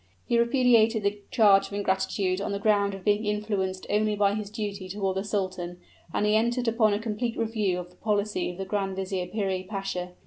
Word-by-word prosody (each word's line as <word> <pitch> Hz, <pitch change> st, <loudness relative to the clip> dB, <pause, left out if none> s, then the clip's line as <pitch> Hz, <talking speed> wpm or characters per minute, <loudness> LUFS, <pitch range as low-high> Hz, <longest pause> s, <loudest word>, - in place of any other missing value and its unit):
He 235 Hz, -, +2 dB
repudiated 235 Hz, -3 st, +4 dB
the 200 Hz, +1 st, 0 dB
charge 200 Hz, -3 st, +5 dB
of -, -, -12 dB
ingratitude 190 Hz, -1 st, 0 dB
on -, -, -2 dB
the 200 Hz, -, -1 dB
ground 200 Hz, -1 st, +2 dB
of 195 Hz, -, -11 dB
being 205 Hz, +1 st, +2 dB
influenced 205 Hz, -3 st, -2 dB
only 210 Hz, 0 st, +1 dB
by 200 Hz, -1 st, +3 dB
his 210 Hz, -1 st, -4 dB
duty 205 Hz, -3 st, -5 dB
toward 195 Hz, -1 st, -1 dB
the 195 Hz, -, -1 dB
sultan; 185 Hz, -4 st, -3 dB, 0.3 s
and 210 Hz, -, 0 dB
he 210 Hz, 0 st, +3 dB
entered 235 Hz, +2 st, +1 dB
upon 220 Hz, -2 st, +3 dB
a -, -, -2 dB
complete 225 Hz, +1 st, -3 dB
review 215 Hz, -5 st, 0 dB
of 180 Hz, 0 st, -7 dB
the 180 Hz, -, -24 dB
policy 205 Hz, -3 st, 0 dB
of 180 Hz, -, -7 dB
the 195 Hz, -, -4 dB
Grand 195 Hz, -1 st, -2 dB
Vizier 190 Hz, -1 st, -3 dB
Piri 190 Hz, -2 st, -1 dB
Pasha. 185 Hz, -2 st, -4 dB
205 Hz, 205 wpm, -27 LUFS, 190-215 Hz, 0.3 s, charge